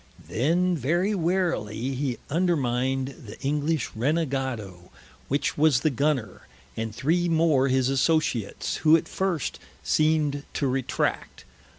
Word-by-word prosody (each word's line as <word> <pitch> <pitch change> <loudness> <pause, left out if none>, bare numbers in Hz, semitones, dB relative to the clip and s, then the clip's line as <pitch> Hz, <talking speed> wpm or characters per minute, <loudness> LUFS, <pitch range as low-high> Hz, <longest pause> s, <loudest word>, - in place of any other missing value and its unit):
Then 175 +9 +1
very 170 - +1
warily 165 - -1
he 130 -2 -2
undermined 135 -6 0 0.2
the 105 - -10
English 150 +1 -1
Renegado, 130 - -2 0.4
which 140 +1 -1
was 150 -5 +4
the 155 - +2
Gunner, 130 -6 -1 0.3
and 110 0 -3
three 170 +8 +1
more 160 -5 +3
his 130 -1 +2
Associats, 135 -5 0
who 160 +1 +5
at - - -6
first 185 -7 -2 0.2
seemed 155 -2 +1
to - - 0
retract. 130 -1 -2
140 Hz, 115 wpm, -26 LUFS, 130-160 Hz, 0.4 s, who